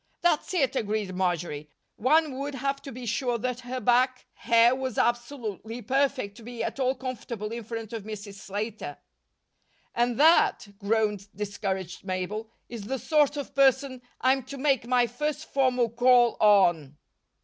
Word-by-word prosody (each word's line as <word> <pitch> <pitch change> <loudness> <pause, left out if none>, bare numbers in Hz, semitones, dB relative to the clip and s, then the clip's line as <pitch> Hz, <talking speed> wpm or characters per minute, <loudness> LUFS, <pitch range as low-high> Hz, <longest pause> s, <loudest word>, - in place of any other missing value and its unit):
"That's 345 -4 +1
it," 275 -6 +1
agreed 210 -4 -1
Marjory. 175 -5 -2 0.3
"One 285 +2 +2
would 280 0 -4
have 275 +1 -2
to 275 - -8
be 250 0 -8
sure 240 +1 0
that 250 +1 -3
her 250 +1 -5
back 255 +1 +2
hair 235 +1 +4
was 260 -3 -4
absolutely 240 -2 -2
perfect 265 -4 0
to - - -12
be 240 0 -5
at - - -4
all 260 0 +1
comfortable 235 -4 -5
in 235 0 -5
front 225 0 -6
of 225 - -4
Mrs. 205 -1 -7
Slater." 200 -6 -5 1.0
"And 240 0 0
that," 335 - +4
groaned 210 -1 0
discouraged 190 -3 -4
Mabel, 195 +4 -4 0.2
"is 230 -4 -7
the 265 +5 -2
sort 295 +1 +2
of 285 - -5
person 270 -1 +3 0.2
I'm 265 +1 +3
to 275 +1 -8
make 265 -4 +1
my 245 -1 +3
first 295 +6 -3
formal 255 -4 +1
call 245 0 +4
on." 175 -9 +4
240 Hz, 155 wpm, -27 LUFS, 210-265 Hz, 1.0 s, hair